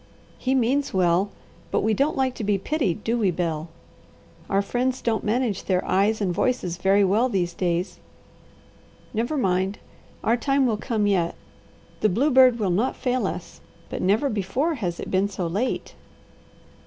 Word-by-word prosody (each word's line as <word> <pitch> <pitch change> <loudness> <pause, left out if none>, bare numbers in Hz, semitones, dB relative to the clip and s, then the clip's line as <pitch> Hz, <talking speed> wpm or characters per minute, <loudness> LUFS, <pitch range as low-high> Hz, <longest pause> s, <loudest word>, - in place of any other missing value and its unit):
He 260 +1 0
means 265 0 +1
well, 180 +2 +3 0.4
but - - +1
we 220 +1 +2
don't 280 +8 +1
like 260 -1 +1
to 225 - -6
be 205 -1 +2
pitied, 215 - -1
do 235 +1 0
we, 205 -4 +3
Bel? 165 -2 -2 0.8
Our 195 +1 +2
friends 250 +4 -1
don't 225 -2 -1
manage 225 -2 0
their 185 -1 0
eyes 205 +4 +2
and 185 -3 0
voices 180 -5 -1
very 195 +2 +3
well 215 +7 +2
these 180 -5 -1
days. 175 +1 -2 1.1
Never 235 +7 -1
mind! 190 -3 0 0.5
Our 230 +2 +2
time 275 +2 +2
will 225 -4 +1
come 215 -1 -1
yet. 180 -4 +1 0.6
The 215 - +3
bluebird 255 +3 +5
will 205 -5 0
not 220 +9 +1
fail 255 -1 0
us, - - -7 0.3
but - - -3
never 210 +9 +2
before 240 - -1
has 180 - -3
it - - -6
been 190 +1 +2
so 190 -3 -4
late." 200 +10 -2
210 Hz, 165 wpm, -24 LUFS, 185-250 Hz, 1.1 s, bluebird